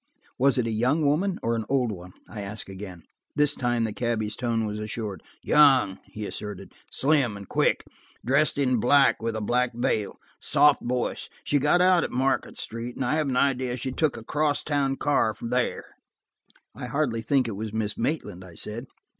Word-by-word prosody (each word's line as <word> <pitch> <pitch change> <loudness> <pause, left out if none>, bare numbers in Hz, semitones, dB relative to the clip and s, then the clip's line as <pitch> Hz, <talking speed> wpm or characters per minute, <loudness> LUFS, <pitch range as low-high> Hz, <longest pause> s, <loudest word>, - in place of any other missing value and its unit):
"Was 135 0 +4
it 125 - +1
a 115 - -1
young 130 +8 +1
woman 175 +7 +1
or 115 +1 +1
an 115 - -2
old 130 -4 +1
one," 90 -2 -9
I 105 - -7
asked 100 +1 -7
again. 95 -3 -9 0.3
This 145 0 +3
time 120 -3 0
the 110 -2 -2
cabby's 110 -3 -1
tone 115 -2 -1
was 105 0 -4
assured. 105 -2 -5 0.2
"Young," 135 -10 +5
he 105 -1 -7
asserted, 105 -1 -6 0.2
"slim 135 -7 +2
and 100 -1 -10
quick: - - +1 0.4
dressed 140 +5 +3
in 130 -3 +2
black, 135 +4 +4
with 115 0 -2
a 110 - -3
black 120 +3 +1
veil. 110 -3 -1 0.2
Soft 150 -1 +4
voice. 125 0 -2
She 145 - +1
got 150 +6 +3
out 180 -1 +5
at - - -2
Market 130 +2 -1
Square, 115 +2 -5
and 130 - -2
I 125 - +1
have 155 -3 0
an 125 - 0
idea 130 -2 +1
she 130 +2 -3
took 155 +3 0
a 115 - -9
cross 150 +2 0
town 140 -2 0
car 135 -7 +1
there." 125 +1 -1 0.9
"I 125 +2 -7
hardly 120 -3 -1
think 130 +2 +1
it - - -3
was 110 +1 -5
Miss 110 -1 -2
Maitland," 115 - -3
I 90 -3 -13
said. 115 +8 -3
120 Hz, 190 wpm, -26 LUFS, 110-140 Hz, 0.9 s, Young